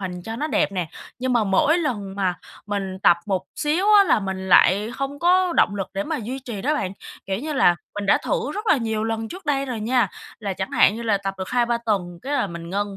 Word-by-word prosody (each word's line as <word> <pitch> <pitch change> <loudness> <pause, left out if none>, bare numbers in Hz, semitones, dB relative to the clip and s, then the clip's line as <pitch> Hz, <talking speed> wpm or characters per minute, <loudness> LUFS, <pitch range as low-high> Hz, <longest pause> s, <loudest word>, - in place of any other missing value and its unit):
hình 180 -2 -5
cho 225 +3 -6
nó 300 +6 -2
đẹp 200 - +1
nè. 180 -4 -2 0.3
Nhưng 255 0 -1
mà 235 -3 +3
mỗi 290 - +3
lần 205 - -3
mà 190 -3 0 0.3
mình 195 -2 -3
tập 175 - +6
một 190 -3 0
xíu 310 +6 0
á, 400 - +7
là 220 - +3
mình 190 -1 -4
lại 200 +4 +5
hông 275 +1 -4
có 360 +1 +3
động 205 - +3
lực 195 -2 -2
để 195 - -2
mà 315 0 -2
duy 250 +3 -5
trì 235 -7 -7
đó 300 +3 +1
bạn. 190 -11 -2 0.3
Kiểu 190 +1 -2
như 305 +4 -4
là, 175 -10 +4 0.2
mình 205 -1 -4
đã - - +5
thử 485 -2 -1
rất 425 +3 -5
là 320 - +5
nhiều 220 -3 -2
lần 225 0 -2
trước 370 - -10
đây 275 -1 +1
rồi 240 -4 -4
nha, 245 +3 +2 0.3
là 200 -3 -2
chẳng 190 +1 -4
hạn 200 - +4
như 235 - -6
là 210 -3 +1
tập 195 0 -4
được 190 - -4
2-3 240 -1 +1
tuần 175 -5 -1
cái 280 - -4
là 285 - +1
mình 170 -2 -8
ngưng. 200 +1 -2
220 Hz, 255 wpm, -23 LUFS, 195-275 Hz, 0.3 s, á